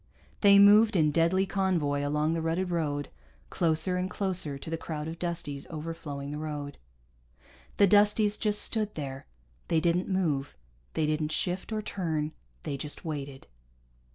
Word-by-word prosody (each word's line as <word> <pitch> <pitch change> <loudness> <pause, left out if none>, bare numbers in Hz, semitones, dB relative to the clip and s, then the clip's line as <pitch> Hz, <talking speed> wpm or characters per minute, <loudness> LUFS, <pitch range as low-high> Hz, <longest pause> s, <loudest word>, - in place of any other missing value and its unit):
They 200 -1 +7
moved 210 +2 +7
in 155 -4 +3
deadly 170 +5 +2
convoy 170 -8 0
along 150 +2 +1
the 165 - -1
rutted 170 +3 -1
road, 145 -4 -1 0.4
closer 165 +1 +1
and 185 +1 -1
closer 185 -7 -2
to 140 - -8
the - - 0
crowd 155 -1 -5
of 165 +1 -6
Dusties 165 -5 -4
overflowing 150 -3 -6
the 150 - -4
road. 145 -2 -5 1.0
The 200 - +6
Dusties 210 +1 +4
just 210 -2 +2
stood 215 -2 -1
there. 135 -3 -6 0.4
They 165 - +2
didn't 170 +3 +1
move. 155 -8 -1 0.4
They 155 - +1
didn't 155 0 -1
shift, 180 +6 -2
or 215 -1 -2
turn. 160 -7 -2 0.3
They 140 - -3
just 150 +4 -5
waited. 140 -4 -5
165 Hz, 155 wpm, -29 LUFS, 150-190 Hz, 1.0 s, They